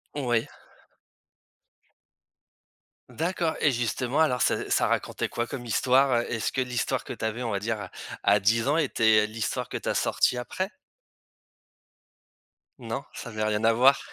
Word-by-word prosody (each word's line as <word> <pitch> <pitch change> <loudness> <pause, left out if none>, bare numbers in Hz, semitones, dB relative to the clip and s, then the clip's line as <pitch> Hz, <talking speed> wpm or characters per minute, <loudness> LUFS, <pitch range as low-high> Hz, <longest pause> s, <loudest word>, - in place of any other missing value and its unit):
Oui. 120 -5 0 2.6
D'accord 165 0 -1
et 145 - +3
justement, 120 +3 -1
alors 125 -6 +2
ça - - 0
ça - - +3
racontait - - -1
quoi 120 - -2
comme 130 -2 -6
histoire? 125 +1 +3
Est-ce 115 -2 -2
que 135 - 0
l'histoire 125 -2 -1
que - - -8
tu - - -5
avais, 110 +3 -2
on 115 - -2
va 100 - -1
dire, 105 -2 -3 0.3
à 100 +1 +5
10 115 +5 +2
ans 150 - +3
était 110 -8 +3
l'histoire 110 0 -3
que - - -7
tu - - -4
as - - 0
sortie 125 - +2
après? 185 +11 -3 2.1
Non, 120 +3 -4
ça - - -7
avait 110 -1 -3
rien 110 0 0
à 115 - +5
voir? 130 +4 +5
120 Hz, 155 wpm, -27 LUFS, 110-135 Hz, 2.6 s, à